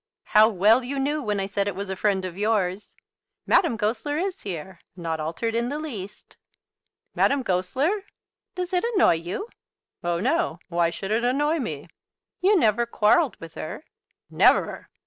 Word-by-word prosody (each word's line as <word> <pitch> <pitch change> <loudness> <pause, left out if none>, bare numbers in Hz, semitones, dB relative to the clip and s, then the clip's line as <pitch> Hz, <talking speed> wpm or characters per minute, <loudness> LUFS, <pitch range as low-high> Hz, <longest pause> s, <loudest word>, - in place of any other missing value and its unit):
"How 215 +1 +5
well 215 +5 +4
you 275 +3 -4
knew 290 +3 0
when 210 -5 -1
I 195 - -1
said 200 +1 -1
it 200 - -2
was 200 0 -4
a - - -2
friend 190 -1 0
of 180 -2 -6
yours. 205 -2 -1 0.5
Madame 315 - +3
Goesler 230 +7 -1
is 370 +2 -2
here, 185 -1 -6 0.2
not 165 -3 -3
altered 165 +9 -2
in 235 +1 0
the 290 - -3
least." 210 -10 -8 0.8
"Madame 275 -1 +2
Goesler!" 260 - 0 0.5
"Does 365 0 -4
it 360 - +2
annoy 375 - +5
you?" 175 - -4 0.6
"Oh, 170 0 0
no. 330 - 0
Why 170 -1 +2
should 195 +4 -6
it 225 +2 +1
annoy 295 +6 +1
me?" 155 - -5 0.5
"You 395 +2 +4
never 235 - +2
quarrelled 235 +6 +3
with 165 -1 -10
her?" 165 - -7 0.5
"Never!" - - +3
215 Hz, 165 wpm, -25 LUFS, 185-285 Hz, 0.8 s, How